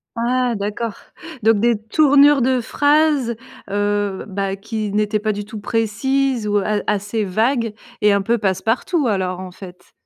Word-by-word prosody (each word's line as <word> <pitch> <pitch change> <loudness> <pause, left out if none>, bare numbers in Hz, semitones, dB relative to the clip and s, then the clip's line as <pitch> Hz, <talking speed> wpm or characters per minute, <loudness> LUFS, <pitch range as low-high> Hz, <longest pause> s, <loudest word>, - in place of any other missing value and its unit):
Ah 245 +1 0
d'accord! 210 +2 -3 0.5
Donc, 220 -2 +4
des 235 -1 +2
tournures 280 +5 +4
de 255 +1 +2
phrases, 290 -1 +2 0.3
heu, 205 -1 -1
bah, 195 0 -2
qui 215 +1 -4
n'étaient 210 +1 0
pas 215 +1 -1
du 205 0 -5
tout 215 0 -8
précises 235 +3 0
ou, 205 0 +1
heu, 200 - 0
a 210 -1 0
assez 210 +1 -1
vagues 225 +4 0 0.3
et 210 0 +5
un 200 - +2
peu 235 +4 +1
passe-partout, 225 - 0
alors, 185 -4 -1
en 185 -1 -7
fait? 180 -1 -13
215 Hz, 160 wpm, -19 LUFS, 205-245 Hz, 0.5 s, et